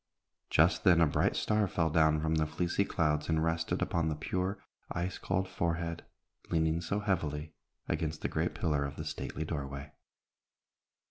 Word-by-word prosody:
Just 85 Hz, +5 st, +4 dB
then 90 Hz, -4 st, +6 dB
a 85 Hz, -, +6 dB
bright 75 Hz, -, +1 dB
star 105 Hz, -1 st, +2 dB
fell 80 Hz, -3 st, 0 dB
down 80 Hz, -1 st, +4 dB
from 80 Hz, 0 st, +1 dB
the 80 Hz, -1 st, +2 dB
fleecy 85 Hz, +5 st, 0 dB
clouds 75 Hz, -4 st, 0 dB
and 80 Hz, -1 st, +2 dB
rested 80 Hz, 0 st, 0 dB
upon 85 Hz, -2 st, 0 dB
the 75 Hz, -, -1 dB
pure, 90 Hz, +5 st, -2 dB, 0.3 s
ice 90 Hz, +2 st, -2 dB
cold 95 Hz, 0 st, 0 dB
forehead, 85 Hz, -2 st, -2 dB, 0.5 s
leaning 80 Hz, 0 st, +1 dB
so 100 Hz, +4 st, -1 dB
heavily 80 Hz, -6 st, -1 dB, 0.3 s
against 80 Hz, -1 st, -2 dB
the -, -, +2 dB
great -, -, -1 dB
pillar 75 Hz, -3 st, +1 dB
of 70 Hz, 0 st, -4 dB
the -, -, -5 dB
stately 80 Hz, -, -4 dB
doorway. 70 Hz, -2 st, -5 dB
80 Hz, 160 wpm, -32 LUFS, 75-90 Hz, 0.5 s, then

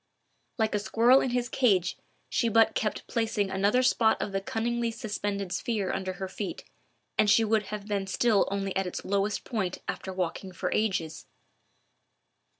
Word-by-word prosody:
Like 220 Hz, -2 st, +1 dB
a 210 Hz, -, +1 dB
squirrel 230 Hz, +5 st, +4 dB
in -, -, 0 dB
his 245 Hz, 0 st, 0 dB
cage 200 Hz, -8 st, +2 dB, 0.3 s
she 235 Hz, -, +1 dB
but 225 Hz, 0 st, +4 dB
kept 215 Hz, -, -2 dB
placing 220 Hz, -4 st, -1 dB
another 205 Hz, +6 st, +2 dB
spot 230 Hz, -3 st, +3 dB
of -, -, -3 dB
the 195 Hz, 0 st, -1 dB
cunningly 235 Hz, +3 st, -1 dB
suspended 205 Hz, -4 st, -3 dB
sphere 200 Hz, +1 st, -1 dB
under 190 Hz, -1 st, -2 dB
her 190 Hz, +1 st, -5 dB
feet, 195 Hz, +1 st, -5 dB, 0.6 s
and 210 Hz, -, +5 dB
she 225 Hz, +3 st, +5 dB
would 215 Hz, -1 st, +1 dB
have 210 Hz, -1 st, -5 dB
been 200 Hz, -2 st, -1 dB
still 210 Hz, +1 st, +2 dB
only 195 Hz, -1 st, -2 dB
at 195 Hz, -1 st, 0 dB
its 180 Hz, -, -6 dB
lowest 200 Hz, +1 st, 0 dB
point 195 Hz, -7 st, -2 dB
after 190 Hz, -, -4 dB
walking 185 Hz, +1 st, -3 dB
for -, -, -3 dB
ages. 190 Hz, -7 st, -1 dB
205 Hz, 165 wpm, -28 LUFS, 195-225 Hz, 0.6 s, and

